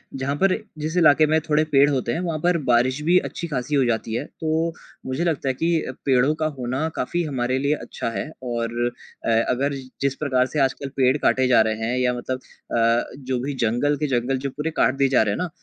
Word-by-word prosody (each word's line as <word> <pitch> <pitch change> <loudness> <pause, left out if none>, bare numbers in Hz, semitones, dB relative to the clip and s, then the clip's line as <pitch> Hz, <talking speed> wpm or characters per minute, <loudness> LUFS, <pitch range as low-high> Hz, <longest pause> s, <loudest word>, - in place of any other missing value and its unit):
जहाँ 135 +2 -2
पर 195 -1 +4 0.2
जिस 155 +3 -3
इलाके 155 -2 +6
में 160 +1 +3
थोड़े 150 +1 +4
पेड़ 140 +1 +5
होते 130 -4 -1
हैं - - -2
वहाँ 165 -3 -2
पर 175 -1 +3
बारिश 125 +3 +2
भी 175 +3 +4
अच्छी-खासी 150 -6 -3
हो 135 - +4
जाती 115 -1 -1
है। 140 - -2
तो 160 +1 -2 0.3
मुझे 130 +6 -2
लगता 160 -5 -1
है - - +1
कि, 165 0 0
पेड़ो 135 +2 +3
का 155 - +1
होना 130 +6 -1
काफ़ी 175 +7 -1
हमारे 130 -4 -1
लिए 140 +2 +1
अच्छा 115 - -5
है - - -3
और 120 -1 -2 0.4
अ, - - 0 0.2
अगर 140 +3 0 0.3
जिस 140 0 +1
प्रकार 130 -4 +2
से 150 - -3
आजकल 135 +1 0
पेड़ 130 +1 +3
काटे 130 -2 +2
जा 125 -3 +5
रहे 110 0 +1
हैं 125 - -1
या 125 -1 +2
मतलब 130 +1 -4 0.4
अ, 115 +1 +3
जो 130 -2 -3
भी 145 - -2
जंगल 135 +7 +1
के 150 - -1
जंगल 130 +2 -1
जो 140 +1 -3
पूरे 150 +4 -4
काट 130 - +3
दिए 135 0 +3
जा 130 - +4
रहे 100 -2 0
हैं - - -3
ना, 180 - -2
135 Hz, 225 wpm, -23 LUFS, 125-155 Hz, 0.4 s, इलाके